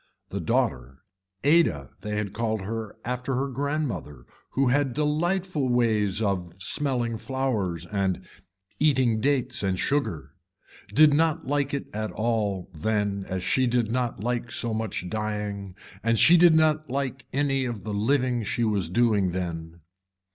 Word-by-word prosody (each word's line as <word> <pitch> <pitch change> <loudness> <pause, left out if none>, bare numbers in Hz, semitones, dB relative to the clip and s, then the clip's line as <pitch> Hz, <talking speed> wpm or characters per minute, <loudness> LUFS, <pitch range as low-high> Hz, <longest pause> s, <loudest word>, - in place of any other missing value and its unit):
The - - -2
daughter, 65 +5 -1 0.4
Ada 140 - +3
they 105 +1 -3
had 100 -2 -3
called 110 -2 -1
her 110 +2 -5
after 125 +2 -2
her 135 +2 0
grandmother 130 - -3 0.3
who 135 -1 +2
had 135 -1 +1
delightful 155 0 0
ways 110 -4 +2
of 90 -4 -1
smelling 120 +2 -2
flowers 110 - -2
and 95 -1 -1 0.5
eating 130 -7 +3
dates 140 0 +1
and 95 -2 0
sugar, 85 - -1 0.6
did 150 0 +6
not 160 +1 +2
like 140 0 0
it 140 - -3
at 110 0 -3
all 105 -5 -1
then 100 +3 -1
as 95 -1 -2
she 130 +7 +2
did 120 -2 +1
not 120 -4 -1
like 120 0 -2
so 115 -1 -1
much 110 -5 -3
dying 105 -2 -3 0.3
and 115 0 +2
she 165 +10 +7
did 170 -1 +7
not 155 -1 +3
like 130 -1 -3
any 135 -1 +1
of 115 -5 -4
the 105 - -4
living 125 +3 +1
she 115 +2 -1
was 100 -6 0
doing 100 -3 +2
then. 85 -2 -5
115 Hz, 145 wpm, -26 LUFS, 100-135 Hz, 0.6 s, she